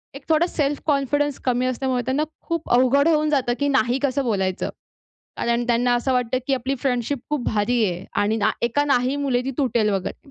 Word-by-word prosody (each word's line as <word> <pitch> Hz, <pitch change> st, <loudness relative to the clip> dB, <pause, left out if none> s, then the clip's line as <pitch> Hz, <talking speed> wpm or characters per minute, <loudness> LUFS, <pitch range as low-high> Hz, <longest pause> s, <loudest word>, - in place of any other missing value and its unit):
एक 275 Hz, -, -9 dB
थोडा 320 Hz, +1 st, +4 dB
self 290 Hz, -4 st, -1 dB
confidence 290 Hz, -1 st, 0 dB
कमी 250 Hz, 0 st, +1 dB
असल्यामुळे 255 Hz, 0 st, -1 dB
त्यांना 265 Hz, +4 st, 0 dB, 0.2 s
खूप 335 Hz, -2 st, -4 dB
अवघड 260 Hz, +4 st, +4 dB
होऊन 305 Hz, -2 st, +2 dB
जातं, 265 Hz, -5 st, +1 dB
की 285 Hz, -, +1 dB
नाही 255 Hz, -3 st, +2 dB
कसं 280 Hz, 0 st, +1 dB
बोलायचं? 190 Hz, -5 st, -1 dB, 0.7 s
कारण 235 Hz, 0 st, 0 dB
त्यांना 245 Hz, 0 st, +2 dB
असं 245 Hz, +2 st, 0 dB
वाटतं, 250 Hz, 0 st, 0 dB
की 275 Hz, -, +2 dB
आपली 265 Hz, +2 st, -2 dB
फ्रेंन्डशिप 255 Hz, +1 st, -1 dB
खूप 295 Hz, -4 st, -1 dB
भारीये 210 Hz, -4 st, 0 dB, 0.2 s
आणि 215 Hz, +2 st, +1 dB
ना 215 Hz, 0 st, +2 dB
एका 240 Hz, +5 st, +1 dB
नाही 265 Hz, -1 st, +1 dB
मुळे 270 Hz, -4 st, 0 dB
ती 270 Hz, -, -2 dB
तुटेल 235 Hz, -6 st, +1 dB
वगैरे. 195 Hz, +8 st, -4 dB
255 Hz, 185 wpm, -22 LUFS, 240-280 Hz, 0.7 s, थोडा